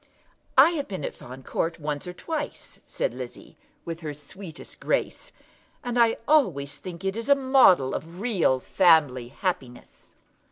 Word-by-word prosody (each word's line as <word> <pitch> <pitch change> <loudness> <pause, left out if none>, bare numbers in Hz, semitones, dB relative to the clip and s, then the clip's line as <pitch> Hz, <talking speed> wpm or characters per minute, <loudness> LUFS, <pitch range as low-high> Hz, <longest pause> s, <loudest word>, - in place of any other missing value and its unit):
"I 285 +6 +8
have 290 -4 -3
been 185 -7 -5
at - - -4
Fawn 130 +2 -11
Court 165 +5 -2
once 150 +1 -4
or 180 - -5
twice," 300 - -6
said - - -2
Lizzie, - - -9 0.3
with 165 -1 -5
her 155 -3 -6
sweetest 160 +3 -9
grace, - - -2 0.5
"and 245 0 -1
I 230 -1 +4
always 175 - +2
think 185 0 -8
it 225 +6 -3
a 280 - +7
model 260 - +5
of 165 +3 -6
real 195 - +2
family 150 -7 +3
happiness." 130 -4 -5
180 Hz, 150 wpm, -26 LUFS, 145-240 Hz, 0.5 s, I